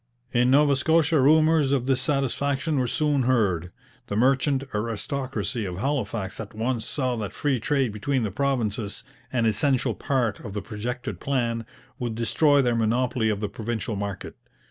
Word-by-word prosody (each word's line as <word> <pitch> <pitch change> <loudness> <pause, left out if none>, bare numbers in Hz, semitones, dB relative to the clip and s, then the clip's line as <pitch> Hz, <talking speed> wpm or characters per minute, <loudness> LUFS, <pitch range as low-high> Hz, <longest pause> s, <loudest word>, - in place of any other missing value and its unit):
In 125 0 +3
Nova 140 +1 +5
Scotia 160 +1 +3
rumours 155 0 +4
of 135 -3 +1
dissatisfaction 135 +2 0
were 125 - +1
soon 150 +1 +1
heard. 100 -9 +1 0.4
The 100 - -3
merchant 135 +3 +2
aristocracy 115 +3 -3
of 90 -3 -4
Halifax 110 -6 -2
at 105 -1 -7
once 115 +1 -1
saw 130 -4 0
that 105 -3 -4
free 140 -4 0
trade 135 -2 0
between 125 +4 -1
the 105 - -2
provinces, 115 -5 -1 0.3
an 120 -3 +1
essential 120 +5 +1
part 125 -7 -1
of 105 - -8
the 105 - -3
projected 120 +4 -5
plan, 115 -4 -1 0.3
would 120 -3 -3
destroy 140 +5 +3
their 120 -1 +2
monopoly 115 +1 +1
of 105 -1 -1
the 105 - -1
provincial 110 0 -4
market. 100 -1 -5
125 Hz, 155 wpm, -25 LUFS, 110-140 Hz, 0.4 s, Nova